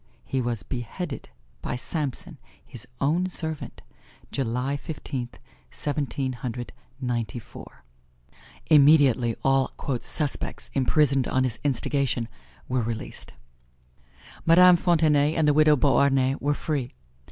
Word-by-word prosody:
He 130 Hz, -, -1 dB
was 120 Hz, -5 st, -3 dB
beheaded 135 Hz, -, -5 dB, 0.3 s
by -, -, -3 dB
Samson, 140 Hz, +1 st, -4 dB, 0.3 s
his 120 Hz, +1 st, -6 dB
own 170 Hz, +6 st, +1 dB
servant, 160 Hz, -4 st, -5 dB, 0.5 s
July 130 Hz, +1 st, -1 dB
Fifteenth, 140 Hz, -4 st, -6 dB, 0.3 s
Seventeen 140 Hz, -3 st, -2 dB
Hundred 120 Hz, 0 st, -6 dB, 0.3 s
Ninety 120 Hz, -2 st, -2 dB
four. 115 Hz, -, -12 dB, 0.8 s
Immediately 140 Hz, -6 st, +5 dB
all 135 Hz, -1 st, +2 dB, 0.3 s
"suspects" 150 Hz, -3 st, -3 dB
imprisoned 135 Hz, 0 st, +2 dB
on 130 Hz, -, +1 dB
his 125 Hz, -3 st, -2 dB
instigation 135 Hz, -3 st, 0 dB, 0.4 s
were 125 Hz, -1 st, 0 dB
released. 115 Hz, 0 st, -6 dB, 1.1 s
Madame 180 Hz, +2 st, +7 dB
Fontenay 155 Hz, -3 st, +3 dB
and 160 Hz, -2 st, +2 dB
the 150 Hz, -, +5 dB
widow 155 Hz, 0 st, +5 dB
Beauharnais 135 Hz, -1 st, +3 dB
were 145 Hz, +1 st, 0 dB
free. 140 Hz, -6 st, -3 dB
135 Hz, 105 wpm, -25 LUFS, 125-150 Hz, 1.1 s, Madame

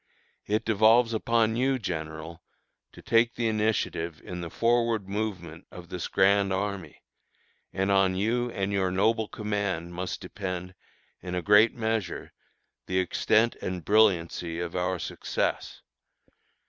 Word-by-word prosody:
"It 105 Hz, +1 st, 0 dB
devolves 115 Hz, +2 st, +4 dB
upon 115 Hz, 0 st, +1 dB
you, 130 Hz, +2 st, +1 dB
General, 80 Hz, -4 st, -6 dB, 0.5 s
to -, -, -14 dB
take 115 Hz, +1 st, +3 dB
the 115 Hz, -, 0 dB
initiative 105 Hz, -7 st, -1 dB
in 90 Hz, -1 st, -6 dB
the 85 Hz, -, -5 dB
forward 115 Hz, -1 st, +1 dB
movement 95 Hz, -5 st, -4 dB
of 85 Hz, -1 st, -11 dB
this 90 Hz, -, -4 dB
grand 100 Hz, 0 st, +3 dB
army; 95 Hz, -4 st, -4 dB, 0.7 s
and 95 Hz, +1 st, 0 dB
on 95 Hz, -1 st, +3 dB
you 120 Hz, +5 st, 0 dB
and 100 Hz, -3 st, -2 dB
your 95 Hz, -2 st, +1 dB
noble 110 Hz, +4 st, +1 dB
command 100 Hz, -6 st, -3 dB
must 90 Hz, +1 st, -4 dB
depend, 90 Hz, -1 st, -6 dB, 0.5 s
in 90 Hz, 0 st, -5 dB
a 90 Hz, -, -2 dB
great 105 Hz, +3 st, +5 dB
measure, 110 Hz, -5 st, -3 dB, 0.5 s
the 95 Hz, -, -1 dB
extent 110 Hz, +5 st, +2 dB
and 90 Hz, -3 st, -4 dB
brilliancy 85 Hz, -5 st, +2 dB
of 85 Hz, 0 st, -4 dB
our 90 Hz, +1 st, 0 dB
success. -, -, -3 dB
100 Hz, 135 wpm, -27 LUFS, 90-110 Hz, 0.7 s, great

